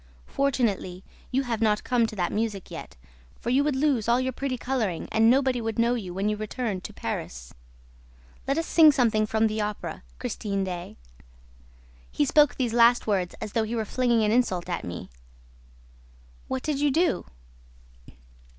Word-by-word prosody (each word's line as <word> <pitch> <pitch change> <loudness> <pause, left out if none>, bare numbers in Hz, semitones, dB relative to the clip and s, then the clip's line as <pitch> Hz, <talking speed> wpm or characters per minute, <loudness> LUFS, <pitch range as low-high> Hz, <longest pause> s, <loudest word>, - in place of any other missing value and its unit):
Fortunately, 210 - -1 0.3
you 265 +1 0
have 230 -3 -3
not 215 -1 +2
come 240 -3 +2
to 215 - -8
that 180 -3 -1
music 210 -3 -3
yet, - - -9 0.4
for 235 - -2
you 270 +3 +4
would 295 -2 0
lose 265 -6 +1
all 240 +1 +4
your 260 0 -1
pretty 265 0 -3
coloring 235 -9 -2
and 225 +1 +4
nobody 260 -1 +3
would 225 -1 -3
know 235 +1 +3
you 205 -7 -4
when 195 +3 -2
you 210 - +1
returned 215 -2 -4
to - - -6
Paris. - - -6 0.9
Let 275 +2 +1
us 330 - 0
sing 320 -3 +7
something 220 -5 +2
from 220 +1 +2
the 215 0 0
Opera, 210 0 -4 0.2
Christine 200 - -3
Daae.' 180 -2 -6 1.1
He 145 - +1
spoke 295 - +4
these 245 -4 -1
last 235 +1 +5
words 190 -5 0
as 215 - -5
though 225 - +1
he 220 +2 -2
were 220 -1 -1
flinging 240 0 +1
an 210 - +2
insult 205 -8 +1
at 175 - -2
me." 90 -6 -7 1.4
"What 260 -1 -3
did 300 -3 -1
you 290 0 +3
do?" 330 +4 +1
225 Hz, 175 wpm, -26 LUFS, 210-255 Hz, 1.4 s, sing